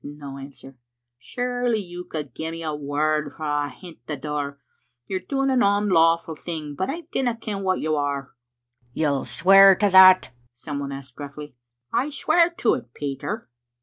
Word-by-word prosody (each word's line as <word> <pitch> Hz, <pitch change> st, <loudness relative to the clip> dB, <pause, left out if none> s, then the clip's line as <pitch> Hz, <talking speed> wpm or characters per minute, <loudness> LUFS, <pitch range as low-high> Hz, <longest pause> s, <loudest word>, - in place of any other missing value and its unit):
" -, -, -40 dB
No 145 Hz, -1 st, -9 dB
answer. 135 Hz, -1 st, -12 dB, 0.2 s
" 120 Hz, 0 st, -59 dB
Surely 245 Hz, -, -1 dB
you 180 Hz, -3 st, -6 dB
could 150 Hz, -6 st, -6 dB
gie 160 Hz, +4 st, -4 dB
me 165 Hz, 0 st, -6 dB
a 155 Hz, -1 st, -2 dB
word 150 Hz, +1 st, -1 dB
frae 145 Hz, -2 st, -2 dB
ahint 170 Hz, +2 st, -12 dB
the 150 Hz, -, -4 dB
door. 145 Hz, 0 st, -4 dB, 0.5 s
You're 190 Hz, +8 st, -3 dB
doing 270 Hz, +5 st, -1 dB
an 255 Hz, -1 st, +3 dB
onlawful 170 Hz, -6 st, +3 dB
thing, 155 Hz, -2 st, -6 dB
but 185 Hz, +6 st, -3 dB
I 330 Hz, +5 st, -3 dB
dinna 245 Hz, -3 st, 0 dB
ken 210 Hz, -3 st, -5 dB
wha 190 Hz, -1 st, +1 dB
you 155 Hz, -3 st, -1 dB
are." 140 Hz, -2 st, -2 dB, 0.3 s
" 120 Hz, 0 st, -41 dB
You'll 145 Hz, -4 st, 0 dB
swear 195 Hz, +2 st, +7 dB
to 205 Hz, +2 st, +2 dB
that?" 185 Hz, -3 st, +8 dB, 0.2 s
some 140 Hz, +4 st, -6 dB
one 140 Hz, -1 st, -4 dB
asked 135 Hz, -2 st, -9 dB
gruffly. 145 Hz, -1 st, -9 dB, 0.4 s
"I 275 Hz, -, +1 dB
swear 335 Hz, +4 st, +3 dB
to 340 Hz, -9 st, +1 dB
it, 120 Hz, -1 st, -6 dB
Peter." 140 Hz, -3 st, -4 dB
155 Hz, 180 wpm, -23 LUFS, 140-195 Hz, 0.5 s, that